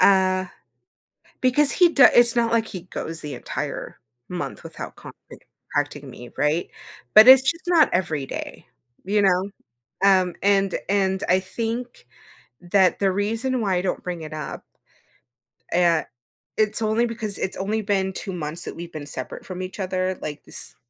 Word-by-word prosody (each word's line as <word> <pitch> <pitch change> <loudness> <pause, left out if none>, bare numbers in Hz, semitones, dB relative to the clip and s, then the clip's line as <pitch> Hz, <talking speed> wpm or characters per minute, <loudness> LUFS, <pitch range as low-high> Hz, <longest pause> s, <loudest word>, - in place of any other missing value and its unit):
uh, 185 -1 +4 0.9
because 270 +3 +4
he 355 -2 +5
do 275 -5 +6
it's 240 0 +5
not 230 -1 +2
like 230 -1 +2
he 185 -5 -7
goes 165 -3 -5
the 145 -2 -6
entire 120 - -5 0.3
month 180 -1 -5
without 160 -1 -8
contact - - -14 0.3
contacting - - -1
me, 120 -1 -11
right? 150 +4 0 0.5
But 215 +3 +9
it's 260 0 +10
just 335 +6 -1
not 335 -4 +5
every 155 -6 -1
day, - - -7 0.4
you 205 +2 +1
know? 190 0 +2 0.5
Um, 185 -2 +4
and 195 -1 +2
and 190 -1 +1
I 185 +1 +4
think 230 - -5 0.5
that 185 0 +2
the 195 -1 +2
reason 225 +6 -1
why 195 -4 +1
I 180 - +1
don't 180 -1 -3
bring 175 -2 -5
it 155 -1 -8
up 155 -2 -6 1.1
uh, 170 -2 +3 0.5
it's 215 +1 +1
only 220 +2 +2
because 220 -3 -4
it's 190 - -3
only 210 +3 -1
been 195 -2 0
2 190 0 -5
months 160 -1 -3
that - - -6
we've 170 0 -8
been 150 -2 -7
separate 130 -2 -6
from 185 -1 -6
each 185 +2 -7
other, 185 -1 -1
like, 150 -1 -6
s - - -6
190 Hz, 165 wpm, -23 LUFS, 175-220 Hz, 1.1 s, it's